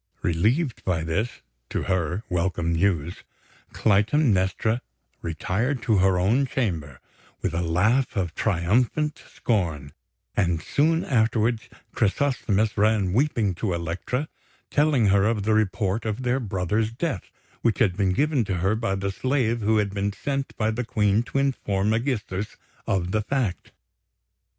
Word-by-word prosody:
Relieved 110 - +1
by 85 -4 0
this, 100 +10 -2 0.3
to - - -2
her, 95 +2 -1
welcome 85 -1 0
news, 85 -2 0 0.5
Clytemnestra 110 -1 +2 0.4
retired 110 - -2
to 110 -4 +3
her 95 0 +3
own 115 +10 +2
chamber 85 - -2 0.4
with 95 - 0
a 85 - 0
laugh 100 +12 +2
of 90 -5 -1
triumphant 115 - +1
scorn; 80 - -1 0.4
and 85 -5 +1
soon 160 - +1
afterwards 115 -2 +1 0.2
Chrysosthemis 110 -2 +1
ran 105 -3 +2
weeping 115 -6 +1
to 90 +1 -2
Elektra, 85 - -3 0.4
telling 145 -6 +3
her 100 0 +4
of 110 -2 +1
the 110 +2 +2
report 105 0 +1
of 110 +3 -3
their 125 +1 +1
brother's 105 0 -1
death 120 - -3 0.3
which 115 - +2
had 100 -8 +2
been 95 -2 +1
given 145 +2 +2
to 95 - -1
her 95 +4 +1
by 110 -3 -1
the 100 0 -2
slave 120 0 0
who 110 +1 +2
had 100 -2 0
been 100 0 -1
sent 135 +7 -3
by 110 0 +1
the 120 +3 -2
Queen 105 -3 +2
to 120 - -4
inform 105 -7 0
Ægisthos 110 -5 -2 0.3
of 90 -2 0
the 110 - +1
fact. 105 -6 -2
105 Hz, 140 wpm, -25 LUFS, 95-120 Hz, 0.5 s, her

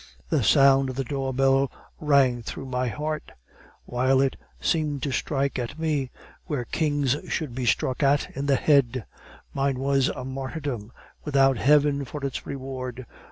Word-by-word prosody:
"The - - +2
sound 135 -1 +5
of 130 - -5
the 135 - -1
door 135 +1 -3
bell 135 +1 +2 0.3
rang 140 -5 +3
through 115 - -6
my 125 -1 -1
heart; 150 +6 -4 0.5
while 130 +2 +2
it 135 -1 +2 0.2
seemed 150 -4 0
to 140 - -1
strike 135 0 -1
at 125 +4 -4
me, 150 -5 -1 0.4
where 145 -8 -2
kings 145 -4 +1
should 150 -7 -2
be 125 0 -3
struck 130 +3 +1
at 140 0 +2
in 140 +1 -3
the 140 - +4
head. 130 - +2 0.5
Mine 135 -1 0
was 135 0 +2
a 130 - -4
martyrdom, 130 -4 -5 0.3
without 135 -3 +3
heaven 145 +1 +3
for 140 +2 -6
its 135 - -4
reward. 130 -2 -6
135 Hz, 160 wpm, -25 LUFS, 130-145 Hz, 0.5 s, sound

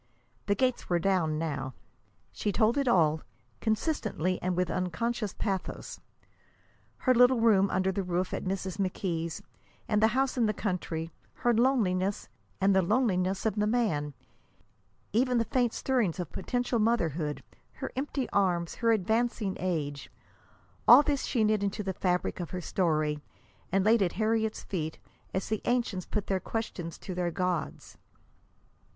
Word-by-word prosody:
The 200 - +3
gates 255 0 0
were 175 - +3
down 170 -4 +1
now. 140 -5 -3 0.6
She 205 - -2
told 220 +3 +3
it 275 - 0
all, 160 -8 +3 0.4
consistently 215 - -1
and 180 -1 -1
with 180 0 +1
unconscious 205 +4 -2
pathos: 195 -3 -4 1.0
her 255 - +3
little 250 0 +5
room 205 -4 +4
under 190 +1 +1
the 195 - -1
roof 180 0 -2
at - - -2
Mrs. 190 -1 -3
McKee's, 175 -3 -2 0.4
and 210 -1 +2
the 220 - +6
house 265 -1 +1
in 230 - +4
the 215 - 0
country; 170 -5 -3 0.3
her 240 - +5
loneliness, 205 -6 +1 0.3
and 195 0 +3
the 190 - +5
loneliness 190 -2 +1
of 220 -1 0
the 210 0 +2
man; 160 - 0 1.0
even 250 +2 +3
the 230 - +2
faint 245 -1 +1
stirrings 225 -11 0
of 180 - -4
potential 245 +3 -1
motherhood, 170 - 0 0.3
her - - -6
empty 270 -1 -2
arms, 175 -4 +1
her 230 -1 +4
advancing 220 -1 0
age 150 -6 -2 0.8
all 290 - +10
this 285 -2 0
she 235 -4 +1
knit 215 -1 +2
into 200 +1 -2
the 190 -1 -2
fabric 180 0 -1
of 175 - -4
her 180 - -4
story 155 -4 0 0.5
and 195 +1 +2
laid 225 +1 +5
at 180 -3 +1
Harriet's 220 +1 0
feet, 160 -4 -4 0.3
as 190 - -2
the 215 -1 -1
ancients 235 -7 0
put 210 -2 -2
their 190 -1 0
questions 180 -6 -4
to 185 - -7
their 175 -1 -1
gods. 180 -3 -3
195 Hz, 155 wpm, -29 LUFS, 175-230 Hz, 1.0 s, all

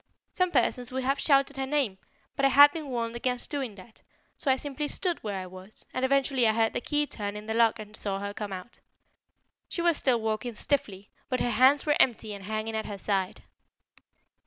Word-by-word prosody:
Some 365 -1 +2
persons 250 -4 +1
would 260 0 -2
have 275 +2 +1
shouted 275 -1 +3
her 265 0 -2
name, 265 -10 0 0.4
but 275 - -2
I - - +7
had 285 +2 +8
been 310 -1 -6
warned 235 -3 -3
against 250 +1 -2
doing 270 -8 -3
that, 210 +3 -15 0.3
so 280 - -3
I 260 - +5
simply 290 +2 -4
stood 350 +2 -1
where 205 -3 -3
I 185 - -6
was, 185 +3 -9
and 255 - -2
eventually 265 -2 +2
I 220 - +3
heard 225 0 +1
the - - -2
key 295 +3 +1
turn 205 -7 -5
in 210 - -8
the 220 - -2
lock 230 -1 +3
and 215 -1 -10
saw 200 -2 -2
her 200 +1 -5
come 205 -1 -5
out. 185 +5 -8 0.9
She 340 - -2
was 340 -3 +3
still 250 -3 +2
walking 220 +1 -2
stiffly, 205 -6 -2 0.2
but 255 -2 0
her 240 - 0
hands 260 +5 +5
were 295 -1 +2
empty 225 -4 +2
and 200 -1 -9
hanging 215 +1 -3
at 220 - -3
her 205 - -5
side." 195 -1 -2
240 Hz, 215 wpm, -28 LUFS, 210-275 Hz, 0.9 s, had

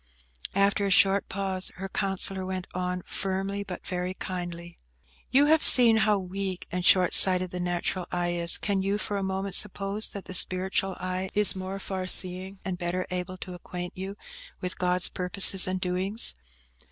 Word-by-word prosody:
After 200 0 +1
a - - -1
short 195 +1 +3
pause, 190 -1 -2
her 195 +1 -6
counsellor 195 -1 -1
went 185 -1 -5
on, 180 0 -4
firmly, 195 +1 -3
but 180 -3 -9
very 180 0 -4
kindly,– 175 -2 -7 0.5
"You 275 +3 +4
have 315 +1 +3
seen 235 -3 +7
how 215 -1 +2
weak 190 0 -5
and 180 0 -3
short 180 -1 +4
sighted 185 -1 +5
the 180 - -5
natural 175 +1 -3
eye 175 0 -1
is; 170 -1 +3
can 200 -2 -1
you 195 +2 -1
for 210 -1 -4
a - - -3
moment 190 0 -3
suppose 200 +2 +3
that 200 - -8
the - - -8
spiritual 190 +2 0
eye 185 +1 -4
is 210 -1 +4
more 190 +1 -6
far 190 -1 -5
seeing 185 +1 +2
and 185 -2 -4
better 180 +1 -2
able 180 +1 -4
to 180 0 -9
acquaint 180 0 -7
you 195 +2 -7 0.4
with 180 0 -5
God's 180 0 +1
purposes 190 +1 +4
and 185 0 -2
doings? 185 - -2
185 Hz, 175 wpm, -26 LUFS, 180-195 Hz, 0.5 s, seen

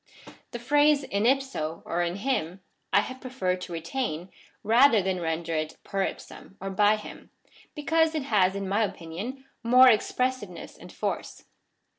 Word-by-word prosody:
The 240 - -6
phrase 290 +3 +3
in 205 -2 0
ipso 260 - -1
(i7i 175 +1 -1
him) 195 -5 -2 0.3
I 200 - +5
have 255 +5 -8
preferred 185 -9 -2
to 180 - -7
retain, 170 0 -3 0.3
rather 230 +2 +5
than 190 -1 -1
render 165 0 -2
it 155 0 -3
per 195 -1 -1
ipsiim 195 - -7 0.2
(by 210 +2 +5
him,) 210 - -10 0.5
because 320 +2 +1
it 305 - -1
has 200 -7 +2
in 200 -1 -3
my 200 +4 +1
opinion 205 +9 -6 0.2
more 255 +2 +7
expressiveness 240 -3 -1
and - - -13
force. - - -4
210 Hz, 145 wpm, -27 LUFS, 180-260 Hz, 0.5 s, more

